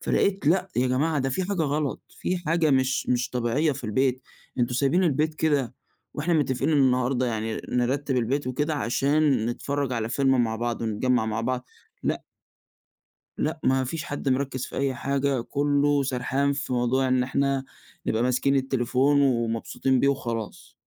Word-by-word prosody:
فلقيت 195 -5 0
لأ 180 +4 +3
يا 125 +1 +3
جماعة، 145 +5 +1
ده 135 -1 0
في 185 - -1
حاجة 190 -3 -1
غلط، 145 -1 -1
في 185 - -3
حاجة 165 -2 +1
مش 130 -1 +1
مش 125 0 +1
طبيعية 125 +6 +1
في 135 -1 -8
البيت. 130 +4 0 0.4
أنتم 120 0 +1
سايبين 140 +8 +2
البيت 155 0 +1
كده 145 -6 0 0.4
وإحنا 165 +4 0
متفقين 135 -1 +1
النهاردة 130 -2 +2
يعني 110 -1 -2
نرتب 130 +2 0
البيت 125 +4 0
وكده 145 +5 -1
عشان 140 -1 +1
نتفرج 140 +3 -2
على 115 -2 -1
فيلم 135 0 +2
مع 110 -1 -2
بعض 120 0 -2
ونتجمّع 115 +2 +1
مع 110 0 -1
بعض، 125 +2 -2 0.4
لأ - - -1 1.1
لأ - - -1
ما 130 0 +2
فيش 155 +5 -4
حد 145 -4 -3
مركّز 130 -1 -1
في - - -9
أي 135 -1 0
حاجة، 140 0 0
كُلّه 145 +2 +1
سرحان 135 +2 0
في 140 -2 -3
موضوع 125 +2 +1
إن 130 -1 +2
إحنا 135 +1 0 0.4
نبقى 110 +2 +1
ماسكين 125 +2 +2
التليفون 135 +1 +2
ومبسوطين 120 0 +1
بيه 140 - +3
وخلاص. 115 -6 -3
135 Hz, 160 wpm, -25 LUFS, 125-145 Hz, 1.1 s, لأ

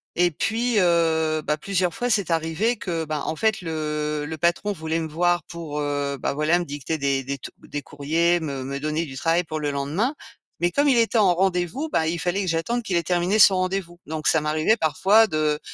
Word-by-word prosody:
Et 175 0 +3
puis, 225 +7 0
heu, 160 -3 +2
bah, 150 - 0
plusieurs 180 0 -1
fois, 245 +7 -2
c'est 200 -6 +1
arrivé 165 +9 0
que, 165 -3 -3
ben, 155 0 -3
en - - -2
fait, 220 +4 0
le 150 -2 -3
le 160 +1 -5
patron 175 +5 +1
voulait 160 -2 -2
me 160 - -3
voir 175 +3 +1
pour, 165 -3 -6
heu, 145 -1 -2
bah, - - -1
voilà, 150 +4 +2
me 175 - -2
dicter 145 +2 -4
des 140 -2 0
des 140 +1 -4
t - - -9
des 145 - -6
courriers, 165 +5 +1
me 140 -5 -4
me 140 +1 -4
donner 155 +3 -1
du 135 -4 -9
travail 165 +6 +1
pour 155 -2 -5
le 150 -1 -1
lendemain. 150 - -1 0.4
Mais 175 +1 +1
comme 285 +6 +2
il 260 - +4
était 230 0 +3
en 190 -4 +4
rendez-vous, 185 - 0
ben, 160 - +2
il 165 +2 -1
fallait 180 +4 -1
que 190 - -3
j'attende 180 +9 -1
qu'il 185 -5 0
ait 170 - 0
terminé 180 +4 +1
son 200 -2 +8
rendez-vous. 185 -2 -2
Donc, 155 0 -3
ça 160 - +4
m'arrivait 155 +8 +2
parfois 195 +8 +4
de, 155 -3 0
165 Hz, 220 wpm, -23 LUFS, 150-185 Hz, 0.4 s, son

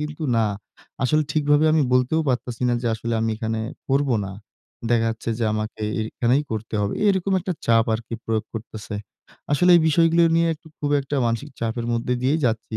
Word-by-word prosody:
কিন্তু 150 +1 -5
না, 115 - +3 0.6
আসলে 155 +4 +3
ঠিকভাবে 145 0 +3
আমি 155 -1 +4
বলতেও 125 +6 +3
পারতেছি 125 -1 -2
না 120 - +2
যে - - -1
আসলে 115 +1 -3
আমি 115 - 0
এখানে 110 0 -2 0.3
করব 140 +1 +2 0.2
না। 95 - -6 0.6
দেখা 115 -1 +3
যাচ্ছে 115 +1 -4
যে 115 - 0
আমাকে 110 0 -4 0.3
এখানেই 125 +5 +1
পড়তে 110 0 -4
হবে। 100 0 -1
এরকম 195 -1 +1
একটা 185 +1 -2
চাপ 115 -1 +4
আরকি 115 +1 -5
প্রয়োগ 110 -1 -1
করতেছে। 110 -1 -7 0.6
আসলে 180 +5 +4
এই - - +5
বিষয়গুলো 165 +2 +4
নিয়ে 165 0 +3
একটু 160 - -22
খুব 145 - -2
একটা 140 +1 -3
মানসিক 115 +6 -2
চাপের 115 +1 -2
মধ্যে 115 +2 0
দিয়েই 140 +5 +2
যাচ্ছি। 115 -2 -1
120 Hz, 185 wpm, -23 LUFS, 115-150 Hz, 0.6 s, এই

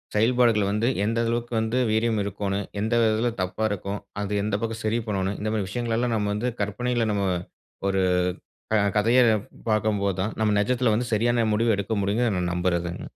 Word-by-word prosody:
செயல்பாடுகள் 115 -2 +3
வந்து 105 +3 +1 0.2
எந்த 115 +2 0
அளவுக்கு 120 +1 -2
வந்து 110 +2 -1
வீரியம் 110 0 +1
இருக்கோணும்? 100 0 -2 0.2
எந்த 110 +2 -1
விதத்துல 110 +1 +2
தப்பா 95 +4 -2
இருக்கும்? 100 +1 -3 0.2
அது 105 0 -3
எந்த 105 -1 0
பக்கம் 115 0 -3
சரி 110 +2 +1
பண்ணணும்? 95 -1 -1
இந்த 110 +1 -2
மாரி 105 -3 -1
விஷயங்களெல்லாம் 120 +2 -1
நம்ம 105 -2 0
வந்து 120 +4 -1
கற்பனையில 120 +3 -1
நம்ம 100 -1 0 0.6
ஒரு 95 -1 +1 0.7
கத 105 - +4 0.2
கதையா 115 +4 +4 0.5
பாக்கும்போது 105 -2 +1
தான், 105 +3 -2
நம்ம 110 -1 +2
நிஜத்துல 125 +3 +2
வந்து 120 +3 0
சரியான 120 +1 +2
முடிவு 115 +1 +2
எடுக்க 100 +2 -3
முடியுங்கன்னு 105 +1 +1
நான் 90 -1 -1
நம்புறதுங்க. 85 -1 -1
110 Hz, 170 wpm, -25 LUFS, 100-115 Hz, 0.7 s, கத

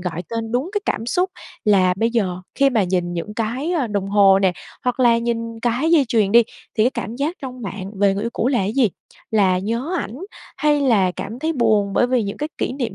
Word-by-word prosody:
gọi 175 -1 -4
tên 225 -1 -4
đúng 255 +7 0
cái 415 - 0
cảm 225 - -2
xúc 360 +8 0 0.3
là 185 -3 +4
bây 225 +4 +1
giờ 190 -6 -1
khi 275 -1 +3
mà 225 -5 +2
nhìn 180 -1 -1
những 175 +5 -5
cái, 245 +9 -2
ơ, 305 -8 0
đồng 200 -3 -2
hồ 195 -1 +5
nè, 190 -2 +2 0.3
hoặc 250 0 -1
là 235 -2 +5
nhìn 230 -1 -3
cái 245 +7 0
dây 320 -5 +5
chuyền 215 -5 +2
đi, 235 +1 +8 0.3
thì 215 - +3
cái 250 - +3
cảm 235 -3 -5
giác 300 +7 -2
trong 255 -2 -7
bạn 195 0 -6
về 200 -1 +3
người 200 +2 -3
yêu 235 - -2
cũ 240 - 0
là 245 -8 +1
gì? 225 +4 +2 0.4
Là 195 -4 +3
nhớ 230 - -2
ảnh, 230 - -5 0.4
hay 295 -1 +2
là 220 -9 +3
cảm 220 +4 -6
thấy 320 +4 -1
buồn 215 -7 +2
bởi 245 - +3
vì 250 -2 +1
những 200 -1 -4
cái 300 - -3
kỷ - - -1
niệm 255 -3 -3
230 Hz, 235 wpm, -21 LUFS, 200-255 Hz, 0.4 s, đi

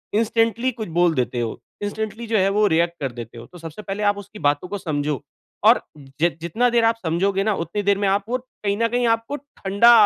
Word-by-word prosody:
Instantly 230 +2 +2
कुछ 220 -4 -6
बोल 175 -1 +4
देते 125 -2 0
हो, 115 -2 -3 0.2
इंस्टेंटली 220 +2 -4
जो 220 -1 +2
है 195 0 +3
वो 210 +1 +3
रिएक्ट 170 +1 +2
कर 135 -3 -2
देते 120 -1 -9
हो। 115 - -9
तो 175 - -14
सबसे 165 +4 -8
पहले 205 +1 -4
आप 205 - 0
उसकी 205 +1 -10
बातों 145 +4 +1
को 205 +3 -4
समझो 150 - -2 0.4
और - - +7 0.4
ज 170 - +6
जितना 225 +9 +1
देर 235 -1 +3
आप 225 0 +4
समझोगे 190 +4 +1
ना 215 +1 +2
उतनी 170 +6 -3
देर 200 0 +3
में 200 -1 +1
आप 200 +1 +2
वो 250 - +1
कहीं 210 -5 -4
न 230 +1 +2
कहीं 245 +1 0
आपको 230 +5 0
ठंडा 235 -5 +3
200 Hz, 225 wpm, -22 LUFS, 170-225 Hz, 0.4 s, और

